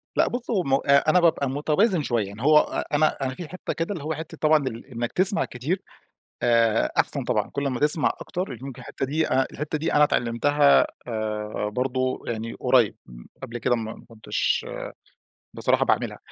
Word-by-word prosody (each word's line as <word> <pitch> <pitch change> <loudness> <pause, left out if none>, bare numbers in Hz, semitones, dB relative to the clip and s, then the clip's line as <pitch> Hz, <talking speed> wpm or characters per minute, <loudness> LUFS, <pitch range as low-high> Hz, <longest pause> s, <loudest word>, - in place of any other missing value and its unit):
لأ، - - +3
بُص 245 0 -4
همّ 180 - 0
أ 140 +2 +4
أنا 180 - +5
بابقى 160 -5 +2
متوازن 155 - +1
شوية، 115 -6 0
يعني 100 +3 -10
هو 150 +3 +6
أ - - -1
أنا 155 +1 +2
أنا 130 -1 -1
في 175 - -7
حتة 185 +3 -5
كده 165 +5 -2
اللي 165 - -7
هو 160 +2 -2
حتة 160 +1 -8
طبعًا 155 -3 +3
ال 115 -2 -6
إنك 120 -1 -3
تسْمع 195 +3 +2
كتير، 155 +11 -3 0.6
آآ 115 -2 +3
أحسَن - - +1
طبعًا، - - 0
كل 140 0 -3
أما 130 -3 -1
تسْمع 150 +1 +3
أكتر 175 -9 -4
يمكن 135 -2 -8
الحتة - - -4
دي 155 +4 0
ا 130 0 +2
الحتة 150 +2 -3
دي 155 - -2
أنا 150 - +5
اتعلّمتها، 145 +2 +3 0.2
آآ 105 -2 -3
برضو 130 +1 -1
يعني 115 0 -4
قريّب، 125 -4 +3
م - - -13 0.2
قبْل 115 - -5
كده 120 +1 +1
م 115 - -3
ما 110 - -9
كنتش 115 -2 -1 0.9
بصراحة - - +2
باعملها. - - 0
135 Hz, 190 wpm, -24 LUFS, 120-155 Hz, 0.9 s, هو